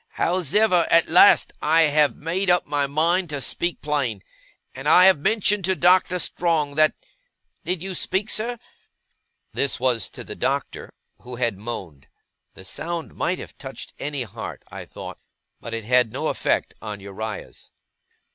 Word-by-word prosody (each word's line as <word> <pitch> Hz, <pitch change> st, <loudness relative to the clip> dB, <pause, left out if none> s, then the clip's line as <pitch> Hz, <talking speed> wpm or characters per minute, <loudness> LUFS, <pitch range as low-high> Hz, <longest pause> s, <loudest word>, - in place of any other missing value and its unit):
Hows'ever, 180 Hz, +1 st, +2 dB
at 165 Hz, 0 st, +4 dB
last 180 Hz, +5 st, +6 dB
I 160 Hz, +2 st, +4 dB
have 150 Hz, -1 st, +3 dB
made 180 Hz, +5 st, -2 dB
up 175 Hz, 0 st, +3 dB
my 145 Hz, -1 st, -1 dB
mind 165 Hz, +5 st, +1 dB
to 145 Hz, -2 st, -3 dB
speak 175 Hz, +6 st, -3 dB
plain; 135 Hz, -9 st, -1 dB, 0.5 s
and 135 Hz, +3 st, -3 dB
I 180 Hz, +3 st, +7 dB
have 190 Hz, -6 st, +6 dB
mentioned 210 Hz, +3 st, +2 dB
to 190 Hz, 0 st, +2 dB
Doctor 180 Hz, +1 st, +3 dB
Strong 165 Hz, -4 st, 0 dB
that 155 Hz, +1 st, +3 dB, 0.7 s
did 180 Hz, -1 st, -2 dB
you 190 Hz, 0 st, -4 dB
speak, 190 Hz, +3 st, -1 dB
sir?' 235 Hz, +3 st, -1 dB, 1.0 s
This 140 Hz, -, 0 dB
was 120 Hz, -5 st, 0 dB
to -, -, -9 dB
the -, -, -8 dB
Doctor, -, -, -3 dB, 0.3 s
who 125 Hz, 0 st, -9 dB
had 120 Hz, -4 st, -1 dB
moaned. 95 Hz, -11 st, -7 dB, 0.5 s
The 95 Hz, -, -12 dB
sound 170 Hz, -, -5 dB
might 180 Hz, -, -1 dB
have -, -, -10 dB
touched 135 Hz, -1 st, -8 dB
any 145 Hz, -3 st, -3 dB
heart, 110 Hz, -, -8 dB
I -, -, -8 dB
thought, -, -, -10 dB, 0.4 s
but 115 Hz, -, -9 dB
it 115 Hz, -1 st, -5 dB
had 125 Hz, -1 st, +3 dB
no -, -, -2 dB
effect -, -, -1 dB
upon 105 Hz, -2 st, -7 dB
Uriah's. 100 Hz, +2 st, -7 dB
155 Hz, 155 wpm, -23 LUFS, 125-180 Hz, 1.0 s, I